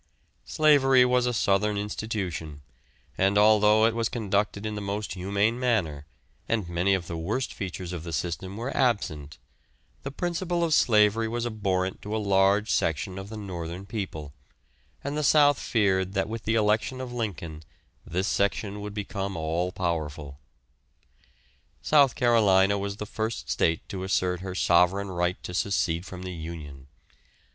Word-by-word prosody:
Slavery 135 -4 +5
was 125 0 +2
a - - +1
southern 105 -1 +1
institution, 95 -8 -4 0.6
and 100 +2 +3
although 105 +1 +5
it 115 - +2
was 115 -1 -1
conducted 105 -2 -1
in 110 - -2
the 105 - -4
most 100 +1 -3
humane 100 +5 0
manner, 85 - 0 0.4
and 110 -6 0
many 90 +3 +1
of 90 -2 -4
the 85 - -5
worst 110 +10 -2
features 90 -2 -5
of 85 - -5
the 85 - -6
system 90 +6 -4
were 120 +4 -4
absent, 80 - 0 0.6
the 135 - -5
principle 175 +3 -2
of 165 -2 +1
slavery 110 -3 +4
was 120 +1 -2
abhorrent 95 -5 -1
to 105 +1 -4
a - - +1
large 100 +1 +2
section 85 +4 -1
of 95 +1 -8
the 110 - -7
northern 90 -2 -6
people, 90 -9 -5 0.7
and 140 +1 -3
the 150 - 0
south 145 0 +5
feared 95 -4 +1
that 95 -1 0
with 110 +1 -6
the 110 - +1
election 110 +4 +1
of 125 -1 -6
Lincoln 85 -9 -4 0.4
this 90 +3 -2
section 100 +1 -1
would 105 0 -7
become 100 -2 -4
all 80 +3 -1
powerful. 75 -6 -3 1.4
South 140 -5 +4
Carolina 100 -5 +4
was 100 0 -4
the 105 - -5
first 110 +1 -4
state 80 0 0
to 95 -3 -5
assert 90 -1 0
her 95 0 -6
sovereign 90 +3 +3
right 90 0 0
to 90 - -6
secede 90 -2 0
from 90 -1 -8
the 90 -1 -5
union. 80 -5 -8
100 Hz, 155 wpm, -26 LUFS, 90-110 Hz, 1.4 s, Slavery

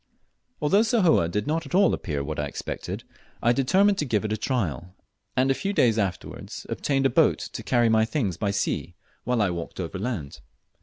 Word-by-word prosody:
Although 195 +8 +4
Sahoe 205 - +3
did 105 +5 -2
not 160 +2 -1
at - - -3
all 200 +1 +5
appear 75 -6 -3
what 75 +1 -4
I 75 - -1
expected, 70 - -5 0.4
I 120 - +4
determined 190 +10 +3
to 150 - 0
give 110 -5 0
it 110 - -1
a - - +1
trial, 90 - -2 0.4
and 130 +1 +3
a - - +4
few 195 +8 -3
days 115 - +3
afterwards 95 -3 -4
obtained 135 -1 0
a - - +5
boat - - +4
to - - -7
carry 120 -1 +2
my 110 -1 +4
things 110 - -1
by 100 +5 -1
sea 100 0 -2 0.3
while 125 -3 +2
I 95 - +1
walked 85 +1 -6
overland. 95 - -4
115 Hz, 195 wpm, -25 LUFS, 90-145 Hz, 0.4 s, all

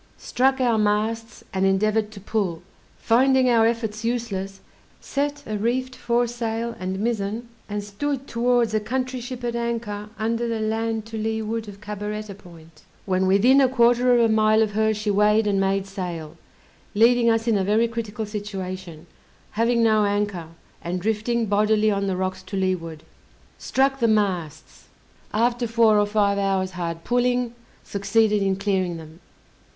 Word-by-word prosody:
Struck 265 +1 +1
our 240 -4 +2
masts, 215 +2 -1
and 190 0 0
endeavored 210 +3 +2
to 215 -2 -11
pull; 190 -5 -2 0.3
finding 260 +2 +3
our 225 -1 +5
efforts 225 -2 -2
useless, 205 -5 -3 0.4
set 285 +1 -3
a 215 -1 -3
reefed 255 +3 -1
foresail 235 -1 -1
and 185 +1 -3
mizzen, 220 +1 -2 0.2
and 205 0 -3
stood 270 +7 -3
towards 240 -2 +1
a 215 - +2
country 255 +3 -3
ship 245 0 -7
at 240 -1 -2
anchor 230 -3 -3
under 230 +2 -1
the 230 -1 -2
land 220 0 -1
to 225 0 -6
leeward 220 0 -2
of 200 0 -11
Cabaretta 210 0 -5
Point. 165 -4 -16 0.2
When 190 -1 +1
within 240 +9 +5
a 265 - +4
quarter 245 0 +3
of - - +4
a 230 - +5
mile 220 0 +4
of 215 - -2
her 220 +1 +2
she 210 0 -1
weighed 210 +2 +3
and 200 -2 +1
made 195 0 0
sail, 175 -5 -6 0.6
leaving 235 +2 +5
us 225 0 +1
in 230 - +3
a 195 - +1
very 215 +4 +2
critical 225 -2 -4
situation, 185 -5 -6 0.5
having 230 +2 +2
no 215 -1 +4
anchor, 200 -4 -1 0.4
and 175 +2 -2
drifting 220 +4 0
bodily 215 +1 +2
on 200 -1 -1
the 190 -1 -1
rocks 185 0 -2
to 195 - -6
leeward. 165 -4 -2 0.6
Struck 270 +1 +1
the 235 - +3
masts: 180 -8 -1 0.4
after 240 +2 +1
four 225 -2 +4
or 205 - +2
five 205 -1 +1
hours 190 -1 0
hard 170 -2 -5
pulling, 245 0 +1 0.3
succeeded 205 +1 +1
in 195 -1 +1
clearing 190 -3 -1
them. 160 0 -12
215 Hz, 160 wpm, -23 LUFS, 195-235 Hz, 0.6 s, our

